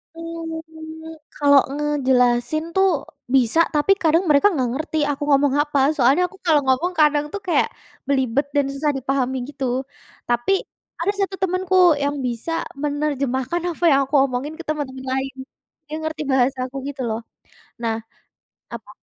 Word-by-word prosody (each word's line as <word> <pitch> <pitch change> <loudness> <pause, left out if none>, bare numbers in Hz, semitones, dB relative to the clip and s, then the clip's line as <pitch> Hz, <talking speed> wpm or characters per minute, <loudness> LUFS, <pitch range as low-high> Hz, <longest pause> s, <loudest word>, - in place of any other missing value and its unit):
Mmm, 320 -1 -8 0.2
kalau 285 -1 +5
ngejelasin 265 -1 +1
tuh 385 0 +4 0.5
bisa, 255 +4 +3
tapi 300 +5 +2
kadang 330 +2 +4
mereka 290 +6 +5
nggak 255 -6 0
ngerti 310 +3 -3
aku 285 0 -4
ngomong 280 -1 +4
apa. 295 -1 0 0.2
Soalnya 270 +5 +4
aku 390 - -17
kalau 310 -4 +4
ngomong 265 +8 +1
kadang 295 -1 +4
tuh 405 - -4
kayak 350 - +2 0.4
belibet 265 -1 +1
dan 285 -1 +3
susah 295 +2 0
dipahami 265 0 -1
gitu, 275 -2 -4 0.6
tapi 240 +6 +1 0.5
ada 345 +4 +1
1 390 0 -1
temenku 370 0 0 0.3
yang 285 +1 0
bisa 240 +6 -3 0.3
menerjemahkan 285 0 -1
apa 340 - -9
yang 275 - +5
aku 275 +3 -3
omongin 270 +3 -4
ke - - -6
teman-teman 265 -4 -4
lain, 265 0 -2 0.6
yang 310 - -3
ngerti 315 0 -4
bahasa 265 +1 +2
aku 260 - -17
gitu 275 -2 -6
loh, 220 0 -2 0.6
nah 225 -1 0 0.8
apa? - - -8
290 Hz, 150 wpm, -21 LUFS, 265-320 Hz, 0.8 s, kalau